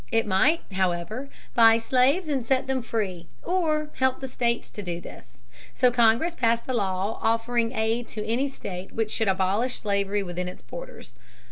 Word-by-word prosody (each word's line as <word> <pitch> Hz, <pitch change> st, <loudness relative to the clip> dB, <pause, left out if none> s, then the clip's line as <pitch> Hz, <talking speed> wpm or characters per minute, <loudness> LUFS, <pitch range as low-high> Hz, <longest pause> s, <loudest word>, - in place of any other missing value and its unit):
It 225 Hz, -, +2 dB
might, 235 Hz, -, +3 dB
however, 190 Hz, +7 st, -1 dB, 0.2 s
buy 225 Hz, -1 st, +7 dB
slaves 260 Hz, +9 st, +2 dB
and 275 Hz, -4 st, 0 dB
set 260 Hz, +2 st, +1 dB
them 265 Hz, -1 st, -1 dB
free 195 Hz, -7 st, -3 dB, 0.2 s
or 310 Hz, -4 st, 0 dB
help 260 Hz, 0 st, +2 dB
the 265 Hz, -, -5 dB
states 235 Hz, -2 st, -1 dB
to 210 Hz, -, -7 dB
do 175 Hz, -3 st, -4 dB
this. -, -, -13 dB, 0.3 s
So 250 Hz, -1 st, +4 dB
Congress 240 Hz, +7 st, +3 dB
passed 230 Hz, -5 st, +1 dB
a 260 Hz, -, -1 dB
law 195 Hz, -1 st, -1 dB
offering 230 Hz, +1 st, +1 dB
aid 225 Hz, +1 st, 0 dB
to 210 Hz, -, -5 dB
any 255 Hz, +5 st, 0 dB
state 190 Hz, -8 st, -7 dB
which 220 Hz, -1 st, -1 dB
should 225 Hz, -, 0 dB
abolish 195 Hz, +6 st, +1 dB
slavery 200 Hz, 0 st, 0 dB
within 180 Hz, 0 st, -4 dB
its 180 Hz, -, -9 dB
borders. -, -, -9 dB
230 Hz, 170 wpm, -26 LUFS, 200-260 Hz, 0.3 s, buy